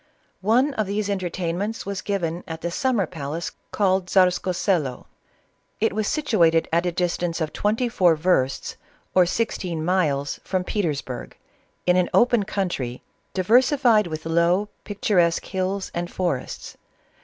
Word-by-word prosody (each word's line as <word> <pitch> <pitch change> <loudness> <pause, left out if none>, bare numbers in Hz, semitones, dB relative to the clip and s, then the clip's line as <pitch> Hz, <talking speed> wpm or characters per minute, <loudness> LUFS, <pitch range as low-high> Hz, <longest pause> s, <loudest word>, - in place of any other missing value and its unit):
One 245 +8 +3
of 215 -5 -1
these 205 +1 -1
entertainments 185 +3 -2
was 200 -1 -3
given 175 -4 -2
at 160 -1 -6
the 170 - -2
sum 260 +7 0
mer 200 -4 +2
paldce 160 0 -5 0.2
called 190 -2 +1
Tzarskoselo. 180 -6 +1 0.7
It 225 -1 +1
was 215 0 -1
situated 175 - +2
at 170 +2 +2
a - - +1
distance 175 -1 -1
of 160 -2 -2
twenty 225 +4 0
four 180 -8 +3
versts, 155 -5 0 0.4
or 180 -1 +5
sixteen 180 -6 -2
miles, 150 -6 0
from 185 -1 -1
Petersburg, 150 - -3 0.5
in 180 0 +4
an 180 - +2
open 240 -4 +4
country, 175 - -3 0.3
diversified 235 - +4
with 160 -1 -6
low, 170 +5 +2 0.2
picturesque 185 -5 +1
hills 190 +1 -2
and 175 0 -3
forests. 175 -9 -3
185 Hz, 135 wpm, -23 LUFS, 170-205 Hz, 0.7 s, or